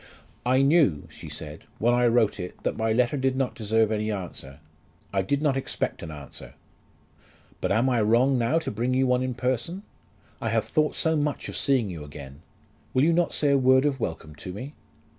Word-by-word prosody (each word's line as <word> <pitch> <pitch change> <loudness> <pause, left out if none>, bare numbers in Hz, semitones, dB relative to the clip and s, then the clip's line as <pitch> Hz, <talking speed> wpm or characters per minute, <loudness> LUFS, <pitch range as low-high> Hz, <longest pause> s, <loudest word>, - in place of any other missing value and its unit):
"I 130 +2 +4
knew," 140 - +3
she - - -10
said, 75 +1 -8
"when 120 +2 +2
I 120 0 +3
wrote 115 -3 +2
it, 90 0 -7
that - - -1
my 110 0 0
letter 125 +4 +2
did 130 -1 +1
not 130 -1 -1
deserve 110 0 +1
any 110 0 -1
answer. 90 -8 -6 0.6
I 95 - +2
did 140 +10 -1
not 145 -3 +2
expect 135 - -3
an - - -7
answer." 75 -3 -10 1.1
"But - - 0
am 115 +6 +3
I 125 -3 +2
wrong 120 +6 +3
now 120 +7 +2
to 165 - -2
bring 120 +4 -1
you 130 +1 +3
one 125 0 +2
in 130 -1 -2
person? 130 - -2 0.6
I - - -1
have - - +1
thought 155 -1 +1
so 160 0 +1
much 150 -1 -1
of - - -6
seeing 130 -8 +1
you 80 -4 -7
again! 70 0 -10 0.5
Will 130 - +4
you 165 +2 +4
not 175 0 +2
say 145 -2 +2
a 140 - +4
word 130 +1 +5
of 140 -2 0
welcome 80 -6 -4
to 90 - -7
me?" 125 +10 -7
125 Hz, 205 wpm, -26 LUFS, 105-135 Hz, 1.1 s, word